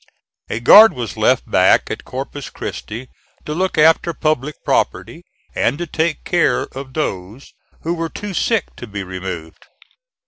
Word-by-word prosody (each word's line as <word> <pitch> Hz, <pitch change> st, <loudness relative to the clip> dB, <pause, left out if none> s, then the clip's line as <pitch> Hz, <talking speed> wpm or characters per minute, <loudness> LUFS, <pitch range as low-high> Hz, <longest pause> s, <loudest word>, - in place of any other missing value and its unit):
A 110 Hz, -, -2 dB
guard 210 Hz, -, +8 dB
was 120 Hz, -5 st, -5 dB
left -, -, +2 dB
back -, -, +3 dB
at -, -, -6 dB
Corpus -, -, -6 dB
Christi 115 Hz, +5 st, -7 dB, 0.4 s
to 150 Hz, -, -3 dB
look 185 Hz, +2 st, -1 dB
after 160 Hz, +2 st, +4 dB
public 150 Hz, -1 st, -1 dB
property -, -, -1 dB, 0.3 s
and 135 Hz, -, 0 dB
to 175 Hz, -, -3 dB
take 160 Hz, 0 st, -2 dB
care 165 Hz, -8 st, +1 dB
of 130 Hz, -1 st, -9 dB
those 105 Hz, -3 st, -4 dB, 0.3 s
who 165 Hz, -, -1 dB
were 165 Hz, -1 st, -3 dB
too 205 Hz, +3 st, -7 dB
sick 220 Hz, +1 st, 0 dB
to 120 Hz, -, -8 dB
be 100 Hz, -1 st, -5 dB
removed. 90 Hz, -3 st, -7 dB
145 Hz, 150 wpm, -19 LUFS, 110-165 Hz, 0.4 s, guard